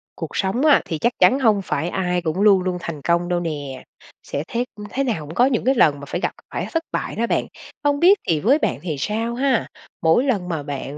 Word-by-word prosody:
Cuộc - - -7
sống 210 +9 0
á 300 - +6
thì 160 - -3
chắc 240 +9 +1
chắn 265 - +5
hông 215 -6 +3
phải 165 -2 -2
ai 180 -1 -1
cũng 165 +3 -2
luôn 200 -3 +5
luôn 185 -1 -1
thành 165 -4 -6
công 170 +3 +1
đâu 175 -1 +1
nè. 145 -6 -5 0.4
Sẽ 140 - -4
thế 240 +1 -2 0.2
thế 275 - -1
nào 215 - -2
cũng 155 +3 -9
có 245 - +5
những 255 -4 0
cái 265 +1 +3
lần 150 - +4
mà 140 - -8
phải - - -4
gặp - - 0 0.2
phải - - -3
thất 330 -1 -1
bại - - -3
đó 235 +1 0
bạn. - - 0 0.4
Không 285 0 +2
biết 375 +5 +6
thì 160 -2 +2
với 245 - +4
bạn - - -1
thì 165 -4 -3
sao 225 +8 -2
ha? 260 -1 +1 0.3
Mỗi 165 +10 +4
lần 205 -10 -1
mà 160 -4 -3
bạn 140 0 -6
190 Hz, 245 wpm, -21 LUFS, 160-245 Hz, 0.4 s, á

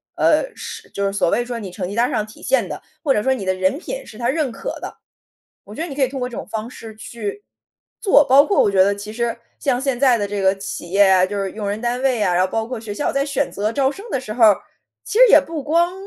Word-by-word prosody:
呃， - - +2
是 - - -8
就 200 - -2
是 195 - 0
所 195 -4 +1
谓 240 - +1
说 240 -1 -5
你 195 -4 -7
成 180 - -5
绩 205 - -6
单 240 +2 +3
儿 - - -5
上 215 -2 -1
体 215 - -15
现 - - +1
的， - - -6 0.2
或 285 -4 +3
者 210 - +1
说 265 - +2
你 250 - -4
的 185 - +1
人 185 +5 0
品 - - -6
是 215 - -12
他 240 +1 -1
认 290 -1 0
可 - - -6
的， - - -8 0.7
我 205 - -11
觉 320 - -4
得 345 - -4
你 275 - -6
可 285 - 0
以 255 - -1
通 265 -1 -6
过 250 - -2
这 240 - -9
种 - - -6
方 220 +2 -5
式 225 -3 -10
去， 220 - -6 0.6
做， 375 -8 +5
包 275 +3 +7
括 400 - +2
我 205 - +2
觉 190 -1 +5
得 200 +1 +2
其 205 +1 -8
实 235 0 -2 0.2
像 255 -3 0
现 270 -2 -1
在 260 -3 +4
的 205 - -1
这 205 0 -3
个 190 0 +4
企 195 -3 -7
业 200 +2 +4
啊， 185 -1 +5
就 200 +1 -3
是 195 - -3
用 210 -2 -4
人 205 +2 -3
单 245 +2 -2
位 255 -5 +1
啊， 180 -3 +2
然 180 +1 +3
后 - - -1
包 225 0 -1
括 250 0 -5
学 220 -2 -7
校 290 - -1
在 275 0 +1
选 285 0 -1
择 210 +3 -2
招 270 0 +2
生 390 +8 -10
的 265 - -1
时 215 -4 -6
候 235 0 +3
儿， 210 -3 +7 0.5
其 425 - -2
实 - - +9
也 - - +8
不 320 -3 -6
光 340 +4 +2
235 Hz, 320 characters per minute, -20 LUFS, 205-275 Hz, 0.7 s, 实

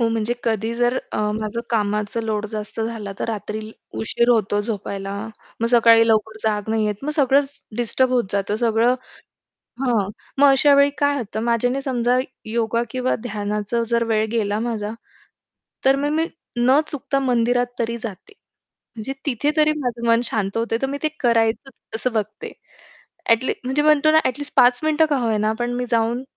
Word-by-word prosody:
हो 230 - +3
म्हणजे 225 +1 -1
कधी 225 0 -1
जर 245 +1 +1 0.2
अ, - - -2
माझं 215 +2 -3
कामाचं 210 0 0
लोड 215 -1 -2
जास्त 215 +1 -5
झाला, 220 -3 -4
तर - - -2
रात्री 215 0 -4 0.3
उशीर 235 +2 +1
होतो 210 -3 +2
झोपायला. 200 -2 -4 0.5
मग 230 - +2
सकाळी 230 -1 +6
लवकर 220 0 +1
जाग 210 -1 -1
नाही 220 -1 +1
येत 210 +2 -3
मग 300 - -1
सगळंच 280 0 +2 0.2
डिस्टर्ब 245 +2 +1
होत 245 -2 +2
जातं, 200 +1 -1
सगळं 230 +2 +2 0.9
हां, 230 -7 +1 0.3
मग 285 +1 +6
अशा 285 +2 +5
वेळी 280 0 +5
काय 285 0 +2
होतं 220 -3 -4
माझ्याने 245 +3 +1
समजा, 250 -2 +1 0.3
योगा 230 +1 0
किंवा 255 +1 0
ध्यानाचं 210 +1 -2
जर 235 0 +2
वेळ 220 -1 +1
गेला 210 -2 0
माझा, 220 -3 -3 0.9
तर 270 0 +6
मग 285 +1 -1
मी 325 +1 +2 0.3
न 255 +4 +4
चुकता 275 -1 -2
मंदिरात 245 -1 +1
तरी 235 0 -1
जाते. 230 - -8 0.6
म्हणजे 225 +4 -4
तिथे 285 +2 +1
तरी 305 0 +4
माझं 240 -3 -3
मन 230 0 +5
शांत 205 -4 0
होते, 230 0 0
तर - - +2
मी 280 +1 -4
ते 310 - +2
करायचंच 235 +2 +1
असं 240 +3 -1
बघते 215 -1 -4 0.8
ॲटलीस्ट. 230 +3 +2
म्हणजे 265 +3 +1
म्हणतो 305 0 +4
ना 315 - +6
ॲटलीस्ट 285 +3 -3
5 245 0 +5
मिनिटं 310 +1 +3
का 290 - +3
होईना 220 -2 +1
पण 240 0 -1
मी 250 0 -2
जाऊन 235 +1 +1
235 Hz, 170 wpm, -21 LUFS, 220-255 Hz, 0.9 s, सकाळी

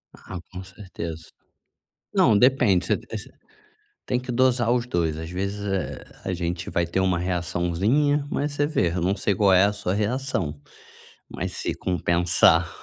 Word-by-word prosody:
Ah, 90 - -8
com 95 0 -7
certeza. 85 -4 -8 0.9
Não, 105 - +5
depende, 115 -7 +4
você - - +1
você - - -6 0.8
tem 125 - 0
que 125 0 -6
dosar 120 -1 +2
os 120 -1 +1
2, 85 -9 -1
às 80 0 -6
vezes, 100 +3 -3
eh, 95 -7 -3 0.2
a 95 - -1
gente 85 0 -3
vai 85 - 0
ter 85 +3 -2
uma 95 -2 +2
reaçãozinha, 90 - 0
mas 145 0 -1
você 145 0 0
vê. 120 - +1
Eu 85 +2 -2
não 95 +3 +1
sei 100 +1 0
qual 100 0 +3
é 95 +1 +6
a 100 - +3
sua 100 -2 -2
reação, 105 - -1 0.7
mas - - -4
se - - -2
compensar 85 -2 +3
95 Hz, 165 wpm, -24 LUFS, 85-120 Hz, 0.9 s, é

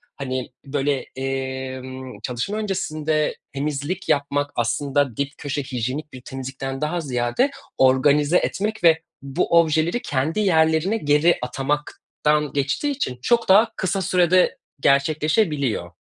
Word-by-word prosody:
hani, 130 -2 -4 0.2
böyle, 140 0 0
emm, 130 -1 -5
çalışma 125 - -3
öncesinde 155 -7 -1 0.2
temizlik 145 +6 -3
yapmak 145 0 +1
aslında 130 +2 0
dip 140 0 0
köşe 145 0 -3
hijyenik 130 +4 -4
bir 130 - -9
temizlikten 135 +1 -6
daha 170 +3 -1
ziyade, 130 - 0 0.3
organize 145 +5 +4
etmek 215 +1 -2
ve 165 -1 +5 0.2
bu 140 +5 +2
objeleri 165 +7 +1
kendi 145 +7 -1
yerlerine 160 +1 +3
geri 150 -1 +3
atamaktan 150 +3 -1
geçtiği 140 - 0
için 130 - -3
çok 235 - +2
daha 220 +4 +6
kısa 190 +1 -1
sürede 180 0 +3 0.2
gerçekleşebiliyor. 145 - +1
145 Hz, 115 wpm, -22 LUFS, 130-170 Hz, 0.3 s, daha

